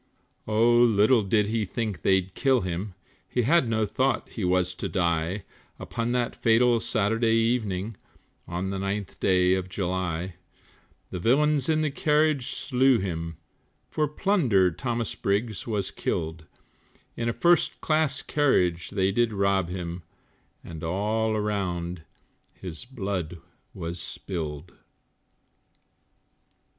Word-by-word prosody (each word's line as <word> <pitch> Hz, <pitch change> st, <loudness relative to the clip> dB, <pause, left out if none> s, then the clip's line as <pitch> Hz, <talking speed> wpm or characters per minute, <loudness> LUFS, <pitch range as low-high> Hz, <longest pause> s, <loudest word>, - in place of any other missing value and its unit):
Oh, 115 Hz, +2 st, +4 dB
little 115 Hz, 0 st, +5 dB
did 105 Hz, +1 st, +2 dB
he 110 Hz, +1 st, -1 dB
think 105 Hz, 0 st, -3 dB
they'd 95 Hz, -1 st, +2 dB
kill 135 Hz, -3 st, +2 dB
him, 90 Hz, +2 st, -4 dB, 0.3 s
He 125 Hz, -, 0 dB
had 135 Hz, -1 st, +3 dB
no 110 Hz, -1 st, +1 dB
thought 130 Hz, +6 st, 0 dB
he 110 Hz, -, -5 dB
was 90 Hz, 0 st, +2 dB
to -, -, -5 dB
die, 85 Hz, +2 st, 0 dB, 0.3 s
Upon 115 Hz, +1 st, -3 dB
that 120 Hz, -1 st, 0 dB
fatal 115 Hz, +1 st, +3 dB
Saturday 115 Hz, +1 st, +1 dB
evening, 115 Hz, -3 st, 0 dB, 0.5 s
On 90 Hz, +2 st, -3 dB
the 95 Hz, -, -3 dB
9th 100 Hz, 0 st, -4 dB
day 90 Hz, -1 st, +3 dB
of 95 Hz, -1 st, -2 dB
July; 90 Hz, -2 st, -3 dB, 0.7 s
The 90 Hz, -, -4 dB
villains 140 Hz, -, +2 dB
in 155 Hz, -1 st, +2 dB
the 155 Hz, -2 st, 0 dB
carriage 150 Hz, -2 st, +2 dB
slew 130 Hz, -1 st, +2 dB
him, 85 Hz, -4 st, -4 dB, 0.5 s
For 155 Hz, -1 st, +1 dB
plunder 140 Hz, -, +2 dB
Thomas 115 Hz, +3 st, -2 dB
Briggs 105 Hz, +3 st, -2 dB
was 105 Hz, -4 st, -1 dB
killed, 80 Hz, -1 st, -3 dB, 0.7 s
In 115 Hz, 0 st, -1 dB
a -, -, +2 dB
first 170 Hz, +4 st, +3 dB
class 155 Hz, -3 st, +1 dB
carriage 90 Hz, -, +1 dB
they 95 Hz, -1 st, +1 dB
did 120 Hz, +2 st, +2 dB
rob 100 Hz, -3 st, +1 dB
him, 90 Hz, -1 st, -5 dB, 0.6 s
And 80 Hz, -1 st, -9 dB
all 105 Hz, +6 st, 0 dB
around 90 Hz, -5 st, -2 dB, 0.5 s
his 90 Hz, +3 st, -8 dB
blood 95 Hz, -, -4 dB, 0.4 s
was 85 Hz, +1 st, -5 dB
spilled. 80 Hz, -3 st, -5 dB
105 Hz, 125 wpm, -26 LUFS, 90-120 Hz, 0.7 s, little